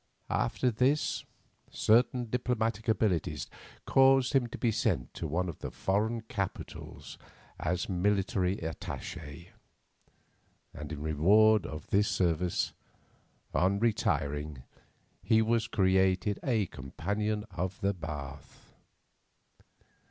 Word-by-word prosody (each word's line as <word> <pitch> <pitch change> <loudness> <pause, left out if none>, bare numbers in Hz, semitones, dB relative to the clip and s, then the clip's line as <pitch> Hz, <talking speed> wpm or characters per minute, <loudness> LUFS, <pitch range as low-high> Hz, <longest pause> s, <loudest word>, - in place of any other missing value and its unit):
After 125 - +1
this, 130 +7 +1 0.4
certain 120 +3 +3
diplomatic 115 -3 -1
abilities 90 - +1 0.4
caused 135 -1 +5
him 130 -3 +3
to 120 - -8
be 120 - +1
sent - - -1
to - - -4
one 90 +5 -1
of 85 - -6
the - - -5
foreign 110 +4 0
capitals 100 -3 -6 0.4
as 85 +1 -1
military 95 0 +1
attache, 80 0 -7 1.2
and 75 0 -7
in 75 -1 -5
reward 100 +6 +4
of 75 -1 -7
this 100 +1 +3
service, 90 -1 0 0.8
on 95 +2 +2
retiring, 75 - -1 0.6
he 110 - +3
was 115 0 +1
created 95 0 +2
a 115 -6 +1
Companion 105 +10 -3
of 95 +1 -3
the 100 +1 +1
Bath. 75 -5 -8
95 Hz, 105 wpm, -30 LUFS, 80-110 Hz, 1.2 s, caused